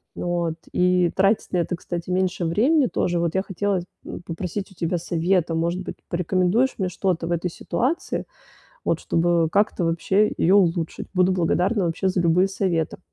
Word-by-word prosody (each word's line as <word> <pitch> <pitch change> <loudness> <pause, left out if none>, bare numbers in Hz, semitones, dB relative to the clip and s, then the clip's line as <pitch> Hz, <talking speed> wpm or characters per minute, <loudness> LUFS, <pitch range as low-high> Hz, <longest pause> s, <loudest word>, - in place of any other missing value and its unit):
вот, 175 -2 -1 0.2
и 180 -1 +3
тратить 195 +3 +2
на - - +2
это, 175 +1 0
кстати, 175 0 -6
меньше 180 -1 0
времени 250 - +3
тоже. 175 -5 -1
Вот 170 -1 0
я 190 - +1
хотела, 195 0 -1 0.3
м, - - -7
попросить 180 +4 -5
у 190 - -17
тебя 170 +1 -1
совета, 170 0 0
может 170 +3 -1
быть, - - -6
порекомендуешь 185 +8 +1
мне 190 -3 -1
что-то 180 -2 -1
в - - -3
этой 175 +1 -1
ситуации, 270 - -2 0.6
вот, - - +1
чтобы, 170 0 +2
э, - - -7
как-то 200 -3 +1
вообще 190 +5 +2
её 190 +4 +4
улучшить? 170 -3 0
Буду 185 0 +3
благодарна 185 +3 +1
вообще 170 +3 0
за 185 0 0
любые 175 +3 +3
советы. 180 -5 -1
180 Hz, 175 wpm, -23 LUFS, 170-190 Hz, 0.6 s, её